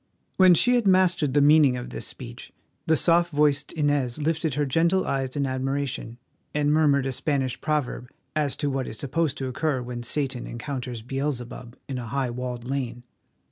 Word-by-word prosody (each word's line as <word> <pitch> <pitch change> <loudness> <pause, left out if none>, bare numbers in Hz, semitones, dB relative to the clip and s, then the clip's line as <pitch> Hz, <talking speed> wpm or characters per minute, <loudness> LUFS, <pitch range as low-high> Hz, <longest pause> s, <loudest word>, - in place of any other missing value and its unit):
When 185 -2 +7
she 245 +9 +4
had 240 -4 +2
mastered 180 -7 +3
the 145 - +5
meaning 145 -3 +5
of 125 - -7
this - - -5
speech - - -9 0.4
the 160 - +4
soft 170 +2 +3
voiced 145 -1 +2
Inez 145 -6 0
lifted 160 -1 0
her 145 0 +1
gentle 170 +7 +2
eyes 135 -1 -2
in 140 -1 0
admiration, 130 -2 -3 0.4
and 150 0 +2
murmured 145 -3 +3
a 135 - -1
Spanish 130 -1 -1
proverb 150 -5 -2 0.3
as 150 -3 0
to 145 - -1
what 135 -1 -2
is 110 - -6
supposed 145 +2 -1
to 135 - -3
occur 135 +2 -1
when 120 0 -5
Satan 130 0 -2
encounters 125 -1 -5
Beelzebub 125 -2 -4
in 130 -2 -4
a 120 - -6
high 130 +1 -1
walled 125 0 -5
lane. 125 -3 -3
140 Hz, 180 wpm, -25 LUFS, 125-150 Hz, 0.4 s, When